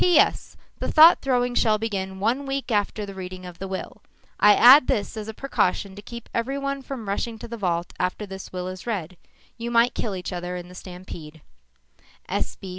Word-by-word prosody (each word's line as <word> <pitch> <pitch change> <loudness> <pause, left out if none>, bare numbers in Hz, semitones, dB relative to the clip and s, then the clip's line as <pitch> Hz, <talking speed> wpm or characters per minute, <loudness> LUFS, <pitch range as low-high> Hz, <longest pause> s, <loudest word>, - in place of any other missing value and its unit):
P.S. 355 -3 +3 0.2
The - - -2
thought 320 +2 +8
throwing 245 -2 +1
shall 220 -3 +3
begin 190 -3 -3
one 245 +7 0
week 270 -2 -3
after 210 0 0
the 200 - -8
reading 185 -1 -8
of 175 -1 -10
the 195 - -4
will. 190 0 -6 0.4
I 210 0 +7
add 255 +4 +8
this 205 - -1
as 215 -1 -6
a - - -3
precaution 200 -7 0
to 205 - -9
keep 235 +2 -9
everyone 275 +3 -2
from 260 -5 -7
rushing 225 +3 -2
to - - -9
the 235 - -6
vault 175 -5 -2
after 185 +3 -1
this 195 -1 -9
will 180 0 -4
is 185 +4 -8
read. 185 -6 -3 0.4
You 235 +1 -3
might 235 +1 +3
kill 210 -4 -3
each 180 0 -5
other 180 0 -4
in 175 0 -7
the - - -12
stampede. 175 -4 -10
205 Hz, 190 wpm, -24 LUFS, 185-240 Hz, 0.4 s, thought